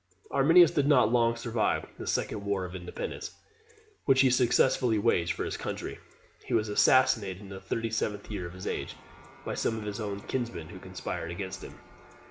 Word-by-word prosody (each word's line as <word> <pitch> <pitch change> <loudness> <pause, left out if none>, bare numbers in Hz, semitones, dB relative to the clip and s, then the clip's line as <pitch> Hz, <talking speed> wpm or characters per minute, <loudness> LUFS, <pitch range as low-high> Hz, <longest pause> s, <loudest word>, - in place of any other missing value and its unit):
Arminius 165 +5 +6
did 145 -2 +1
not 130 -6 +5
long 115 -1 +3
survive 115 -1 0
this - - -2
second 100 - -2
war 100 -2 -1
of 90 - -8
independence, 90 -1 -6 0.7
which 135 -1 +5
he 130 -2 +5
successfully 125 -1 +3
waged 90 -6 +2
for - - -3
his - - -3
country. - - -5 0.4
He - - -1
was 110 -1 +1
assassinated 105 -4 +3
in 100 -1 -11
the 95 -1 -8
thirty 115 +4 -3
seventh 105 -2 -2
year 90 -4 -4
of 85 - -10
his 95 0 -9
age, - - -3 0.5
by - - -3
some 115 - -1
of 110 - -5
his 105 +1 -4
own 100 -2 -4
kinsmen, 120 -12 -4
who - - -10
conspired 85 - -5
against 95 +2 -5
him. - - -10
110 Hz, 185 wpm, -29 LUFS, 95-125 Hz, 0.7 s, Arminius